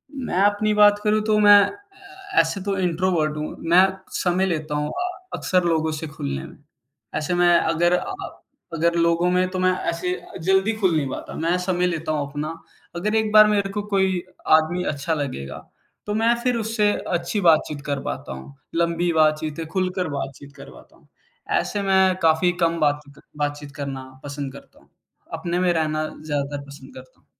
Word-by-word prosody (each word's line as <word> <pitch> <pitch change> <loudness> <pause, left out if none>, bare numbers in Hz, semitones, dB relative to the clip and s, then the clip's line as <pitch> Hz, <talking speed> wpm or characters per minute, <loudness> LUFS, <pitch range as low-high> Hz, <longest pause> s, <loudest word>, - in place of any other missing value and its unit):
मैं 250 -9 -3
अपनी 205 +1 +2
बात 205 0 +5
करूँ 215 0 +2
तो 215 -1 +3
मैं 205 -1 +8
अ, 400 - -5
ऐसे 200 - -3
तो 200 0 -1
इंट्रोवर्ट 175 -3 0
हूँ। 150 - -4
मैं 175 +2 +7 0.3
समय 185 +1 +1
लेता 155 -4 -2
हूँ 150 0 -1
अ 360 0 -3 0.3
अक़्सर 185 -1 +1
लोगों 160 -2 +1
से 155 +1 -5
खुलनें 70 - -5
में। - - -13 0.6
ऐसे 155 +3 -1
मैं 175 0 +4
अगर 175 +2 +2
अ - - +2
अ, 390 0 -7 0.3
अगर 170 +1 +1
लोगों 170 +1 +2
में 185 0 +2
तो 185 0 -4
मैं 185 0 +3 0.2
ऐसे 175 +2 -2 0.3
जल्दी 190 +4 +2
ख़ुल 185 -6 +2
नहीं 145 -3 0
पाता - - -7
मैं 170 +3 0
समय 180 -1 +1
लेता 165 -2 -2
हूँ 150 -2 -1
अपना। 150 +2 -4 0.4
अगर 210 +5 -1
एक 220 -1 +1
बार 215 0 +8
मेरे 200 -2 +1
को 205 +1 -3
कोई 190 -2 +2 0.4
आदमी 175 +3 -1
अच्छा 145 +4 -2
लगेगा 135 - -4 0.5
तो 210 - -2
मैं 230 +2 +3
फिर 250 -1 +1
उससे 220 -1 +1 0.2
अच्छी 175 +4 -1
बातचीत 155 -4 +3
कर 140 -2 -2
पाता - - -5
हूँ, 65 +1 -11 0.2
लंबी 170 +1 +1
बातचीतें, 155 0 +1
ख़ुलकर 185 -2 -1
बातचीत 140 0 -6
कर 140 - -11
पाता - - -17
हूँ। - - -27 0.5
ऐसे 205 - -2
मैं 190 -1 +3
काफ़ी 165 +2 +3
कम 165 0 +2
बात 145 -1 +2 0.2
त - - -16 0.2
बातचीत 145 -1 -3
करना 140 -2 -5 0.2
पसंद 140 -1 -5
करता 140 - -15
हूँ। - - -26 0.4
अपने 175 +1 -2
में 180 -1 +2
रहना 155 -1 0
ज़्यादातर 145 -2 -4
पसंद 140 -1 -13
करता 130 0 -14
हूँ। - - -35
170 Hz, 185 wpm, -23 LUFS, 150-195 Hz, 0.6 s, मैं